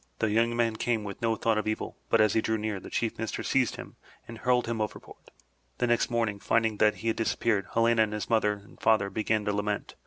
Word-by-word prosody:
The 110 - 0
young 115 +2 +2
man 115 -2 +1
came 115 -1 0
with 100 +3 -7
no 115 -1 +1
thought 110 -1 +1
of 110 - -4
evil, 110 - -3
but 115 - +3
as 110 -2 +4
he 110 - +2
drew 110 0 0
near, 105 -2 -3
the - - -10
Chief 115 -2 -2
Minister 115 -2 -3
seized - - +1
him - - -10 0.3
and 115 -1 -9
hurled 125 +1 +2
him 115 -1 -2
overboard. 105 - -7 0.5
The 125 - +1
next 120 -1 +2
morn 120 -2 +1
ing, 100 -1 -7
finding 110 0 +1
that 105 0 +3
he - - +2
had 110 - -1
disappeared, 110 -3 0
Helena 115 0 +4
and 105 -1 +1
his 105 - -3
mother 110 -2 +2
and 100 0 -14
father 100 -3 +3
began 110 -1 0
to 105 - 0
lament. 105 0 -2
110 Hz, 245 wpm, -28 LUFS, 105-115 Hz, 0.5 s, as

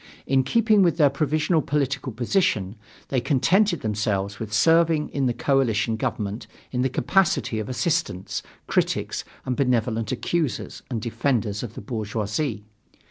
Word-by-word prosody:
In 135 0 +3
keeping 215 - +3
with 170 -3 +3
their 145 -4 +5
provisional 155 +3 +1
political 140 -2 -1
position, 115 - 0 0.3
they 130 -3 +1
contented 165 - +2
themselves 100 -2 -1
with 110 -2 -5
serving 160 +5 +3
in 135 -2 0
the - - +2
coalition 115 -4 +1
government 105 0 -3 0.2
in 125 - -1
the 130 - +2
capacity 130 - +1
of 110 - -4
assistants, 140 - -1 0.2
critics, - - 0 0.2
and 125 - -1
benevolent 115 -4 0
accusers 130 0 -2
and 115 -4 -3
defenders 115 -3 -1
of 115 -3 -7
the - - -7
bourgeoisie. 110 +2 -3
125 Hz, 135 wpm, -24 LUFS, 110-150 Hz, 0.3 s, their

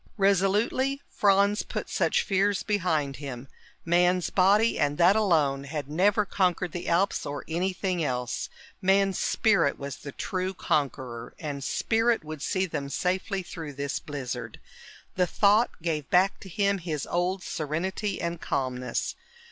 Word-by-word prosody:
Resolutely 205 +8 +2
Franz 200 +1 +3
put - - -5
such - - +1
fears 200 0 +1
behind 165 -9 0
him. 135 -3 -7 0.4
Man's 175 +1 +2
body, 205 +4 +4
and 145 -1 +1
that 180 +3 +5
alone, 155 -10 +2
had 145 -1 -4
never 195 +7 +2
conquered 180 -3 0
the 175 - -4
Alps 185 +4 +2
or 145 0 -5
anything 180 +1 -1
else. 125 -3 -2 0.3
Man's 195 0 +3
spirit 200 -10 +2
was 140 -2 -6
the 140 - -8
true 185 +5 -3
conqueror, 125 -7 -2
and 145 -4 -5
spirit 225 - +1
would 155 -1 -7
see 190 +3 0
them 150 -5 -4
safely 190 +4 -1
through 160 -4 -7
this 140 +1 -3
blizzard. 125 -5 -6 0.6
The 180 -1 +3
thought 210 +6 +4
gave 155 -4 -2
back 185 +3 +3
to 190 - -11
him 200 +1 +1
his 160 -5 -3
old 180 +1 -1
serenity 185 +6 -2
and 170 0 -3
calmness. 125 -1 -2
180 Hz, 140 wpm, -27 LUFS, 145-195 Hz, 0.6 s, that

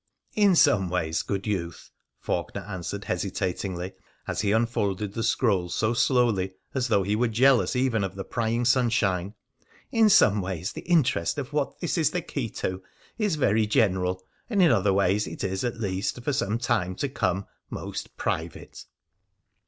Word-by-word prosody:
In 205 -3 +4
some 110 - +4
ways, 80 -3 -1
good 100 -1 -3
youth,' 85 -6 -4 0.3
Faulkener - - -3
answered 95 +1 -5
hesita 95 0 -2
tingly, 95 -1 -5 0.3
as - - -1
he 100 -2 +1
unfolded 105 -3 0
the 115 - -3
scroll 105 -6 +1
so 110 +6 0
slowly 115 -7 +2 0.2
as 130 -2 0
though 100 -4 +2
he 100 +3 0
were 120 +3 +2
jealous 125 +3 +3
even 125 -5 +1
of 95 -1 -4
the 95 - -5
prying 115 +2 -1
sunshine, 110 -7 +1 0.3
' - - -31
in 225 -2 +4
some 105 - +5
ways 90 -1 -4
the - - -7
in 170 -4 +6
terest 120 -10 -1
of - - -5
what - - -1
this - - -1
is - - +3
the - - -3
key - - -4
to 95 0 -4 0.4
is 210 -6 +1
very 110 -7 +2
general, 95 -4 +1 0.3
and 210 -4 0
in 170 - +6
other 100 -3 +3
ways 100 +2 +2
it - - -6
is, 95 -1 -2
at 120 -2 -3
least 100 +3 -2
for 145 - 0
some 115 -5 0
time 95 -6 0
to 140 - -2
come, 100 -7 -1 0.2
most - - -6
private.' - - -4
105 Hz, 175 wpm, -26 LUFS, 95-120 Hz, 0.4 s, in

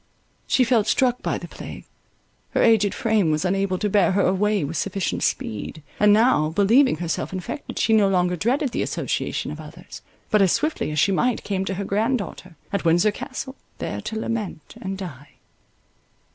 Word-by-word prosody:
She 260 - +3
felt 230 -3 +2
struck 250 0 +2
by - - -1
the - - -8
plague; - - -9 0.7
her - - +4
aged 210 -3 +4
frame 220 -7 +2
was 155 +3 0
unable 195 0 0
to 210 - -1
bear 200 -2 +3
her 200 0 +2
away 205 +1 +2
with 145 +4 -4
sufficient 195 +3 -2
speed; 110 +8 -3 0.2
and 210 0 +6
now, 210 -8 +4
believing 220 - +4
herself 165 0 -3
infected, 190 - -6
she 225 - +2
no 210 -3 +5
longer 180 -1 +2
dreaded 255 - 0
the - - -2
association - - -2
of - - -7
others; - - -11 0.3
but, 210 -2 +4
as 190 -3 +4
swiftly 310 - -1
as 150 - -4
she 195 +6 +3
might, 240 +5 +1
came 195 -1 -2
to 195 - -2
her 200 +2 -3
grand 225 +7 +1
daughter, 185 -3 -8 0.2
at 200 - 0
Windsor 170 +5 +4
Castle, 265 +5 -6 0.2
there - - -4
to 220 - -4
lament 215 -8 -4
and 195 0 -4
die. 145 -8 -9
200 Hz, 185 wpm, -23 LUFS, 180-225 Hz, 0.7 s, and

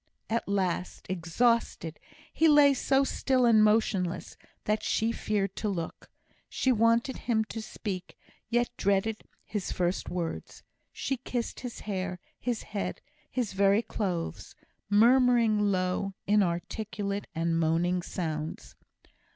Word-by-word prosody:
At 230 - 0
last, 185 -3 -1
exhausted, 175 -1 0 0.3
he 325 - +4
lay 295 -2 +7
so 270 +1 +2
still 260 -2 +1
and 220 -2 +6
motionless, 210 -5 +1 0.3
that 210 0 0
she 225 +1 +1
feared 200 -4 -1
to 215 - -1
look. 170 -5 -5 0.4
She 260 - +1
wanted 230 +3 +2
him 220 -3 +1
to 225 - -5
speak, 195 -4 -6 0.3
yet 240 +1 +1
dreaded 200 +2 +1 0.2
his 210 -3 -3
first 180 +1 -1
words. 175 -2 -5 0.3
She 270 - -2
kissed 245 -1 -4
his 245 -2 -7
hair, 185 -3 -3 0.2
his 240 -3 -2
head, 205 -1 -4 0.3
his 245 -6 -2
very 200 +3 +3
clothes, 180 -8 -3 0.3
murmuring 235 0 +5
low, 185 +1 -1
inarticulate, 200 +1 -1
moaning 165 +2 +1
sounds. 160 -3 -4
205 Hz, 120 wpm, -29 LUFS, 180-230 Hz, 0.4 s, lay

